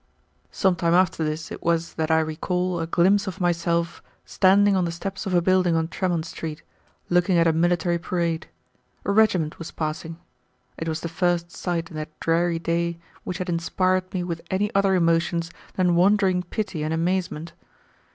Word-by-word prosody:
Some 190 -2 +1
time 170 -1 +2
after 180 -3 +2
this 155 +1 -3
it - - -7
was 170 0 0
that 160 0 -2
I 160 0 +4
recall 180 +3 -2
a 165 - -2
glimpse 195 +5 +3
of 190 +1 -5
myself 170 -1 0 0.2
standing 200 +1 +4
on 185 -2 +2
the 170 - -2
steps 195 +4 -5
of 185 - 0
a 175 - +3
building 185 -2 +3
on 160 0 +1
Tremont 175 -4 -1
Street, 160 -2 -6 0.5
looking 175 +1 +3
at 170 - +4
a 165 - +4
military 175 +1 +1
parade. 170 -1 -2 0.6
A - - +1
regiment 195 -7 +2
was 165 - -6
passing. 160 +1 -4 0.6
It 165 - -5
was 160 - -3
the - - -3
first 170 0 0
sight 170 -2 -3
in 155 - -7
that 155 0 -7
dreary 170 +1 +1
day 170 +1 -1 0.3
which 180 - -3
had 185 - -4
inspired 185 +2 0
me 180 -2 -2
with 170 -2 -4
any 205 +2 0
other 195 -1 +3
emotions 170 -1 +1 0.2
than 180 -2 +2
wondering 185 +1 +3
pity 180 -2 -4
and 155 +1 -1
amazement. 170 -1 -2
170 Hz, 180 wpm, -24 LUFS, 165-185 Hz, 0.6 s, I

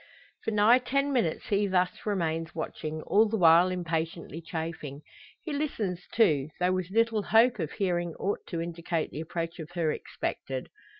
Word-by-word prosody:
For - - -1
nigh 220 +3 +5
ten 275 +3 0
minutes 205 -11 0
he 205 0 +2
thus 185 +2 0
remains 165 -5 -1
watching, 155 -1 -4
all 220 +2 +4
the 220 - 0
while 170 0 +6
impatiently 165 -2 -3
chafing. 160 -3 -5 0.4
He 315 - -4
listens 220 - -2
too; 155 -11 +3
though 180 0 +2
with 185 -1 -2
little 225 +1 +2
hope 225 +2 +4
of 160 -3 -3
hearing 175 -4 -1
aught 200 - -1
to 170 - -3
indicate 170 -1 -3
the 155 - -5
approach 165 +1 -4
of 160 0 -7
her 165 -3 +1
expected. 130 -3 -4
175 Hz, 165 wpm, -29 LUFS, 160-210 Hz, 0.4 s, while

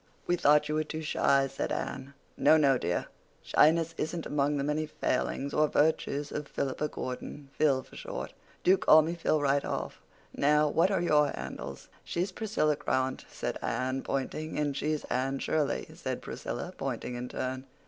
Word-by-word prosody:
"We 175 - +2
thought 150 -2 +4
you 150 - -2
were 155 0 +1
too 155 +1 -5
shy," 140 -3 +3
said 135 0 -3
Anne. 135 +2 -4 0.2
"No, 160 - +5
no, 135 -4 +4
dear. 90 +1 -1 0.4
Shyness 165 +1 +4
isn't 165 +1 -2
among 145 0 +1
the 140 - -1
many 150 +2 -1
failings—or 140 +1 0
virtues—of 150 -1 0
Philippa 140 +2 -2
Gordon—Phil 135 +1 -2
for - - -17
short. - - -6 0.3
Do 190 +2 +5
call 155 0 +7
me 165 +2 -2
Phil 160 -2 +1
right 140 -1 +2
off. - - -4 0.3
Now, 150 +1 +3
what 165 +5 +3
are 195 -4 +1
your 150 -3 +4
handles?" 70 0 -7 0.2
"She's 180 +3 -2
Priscilla 185 -8 0
Grant," 130 -2 -1
said - - -4
Anne, 130 +1 -1
pointing. 155 +3 -3
"And 145 -2 0
she's 150 +1 -1
Anne 135 +2 -1
Shirley," 150 0 0
said - - -4
Priscilla, - - -5
pointing 125 - -4
in 125 +1 -5
turn. 130 +1 -4
150 Hz, 160 wpm, -30 LUFS, 135-155 Hz, 0.4 s, call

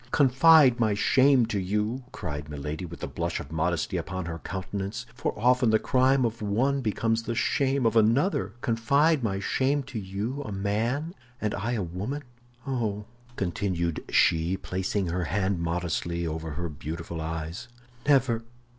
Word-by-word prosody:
"Confide 135 -1 +6
my 110 -3 +2
shame 130 +3 +4
to 110 -3 -2
you," 105 +7 -1
cried 75 -5 -5
Milady, 75 +4 -5
with 85 0 -10
the - - -3
blush - - -3
of 70 - -9
modesty 85 +3 0
upon 95 +2 -4
her 85 0 -5
countenance, 100 +6 -5
"for - - -2
often 125 +2 +3
the 110 - +5
crime 130 +2 +3
of 115 -1 -3
one 125 +7 +1
becomes 115 0 0
the 115 0 -4
shame 135 +1 +1
of 115 0 +2
another—confide 120 - +2
my 95 -3 0
shame 135 +7 +1
to 130 -3 -6
you, 105 +8 -4
a 110 - -6
man, 115 - -1 0.3
and 105 -1 -1
I 110 +4 -2
a 110 -5 -1
woman? 100 - -4 0.4
Oh," 110 -6 -2 0.3
continued 85 -3 -1
she, 85 +3 +3
placing 95 +2 -2
her 90 +1 -1
hand 95 +1 0
modestly 85 0 -2
over 80 -1 -4
her 85 +3 -3
beautiful 80 +2 -6
eyes, 80 +3 -5 0.4
"never! 130 -5 +3
105 Hz, 155 wpm, -27 LUFS, 85-125 Hz, 0.4 s, Confide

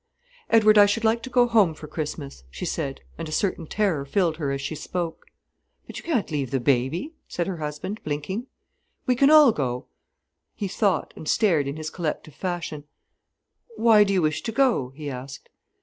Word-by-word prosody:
"Edward, 215 -2 +6
I 205 - +8
should 225 +3 -1
like 225 +1 +2
to 260 - -7
go 245 -1 +4
home 210 -9 +3
for 155 - -10
Christmas," 150 - -6
she 65 -1 -6
said, 135 -1 -3 0.2
and 165 -1 -4
a - - -7
certain 170 -1 -1
terror 190 -9 0
filled 165 +2 0
her 145 -4 -2
as 140 - -2
she 140 +3 -4
spoke. 170 +2 -4 0.6
"But - - -8
you - - -13
can't 260 - -1
leave 140 -4 -1
baby," 140 - +1
said 175 - -2
her 185 -1 -4
husband, 155 +7 -5
blinking. 155 - -3 0.6
"We 250 - +2
can 275 +3 +5
all 305 -4 +8
go." 125 - -3 0.7
He 200 - -3
thought, 190 -2 0
and 155 - -6
stared 165 -10 +3
in 140 - -3
his 155 0 -5
collective 155 -3 -4
fashion. 170 -5 -4 0.9
"Why 225 - +6
do 200 - -1
you 185 -3 +2
wish 155 0 0
to 225 - -3
go?" 235 - +2
he 150 0 -7
asked. 135 0 -7
170 Hz, 185 wpm, -25 LUFS, 150-215 Hz, 0.9 s, I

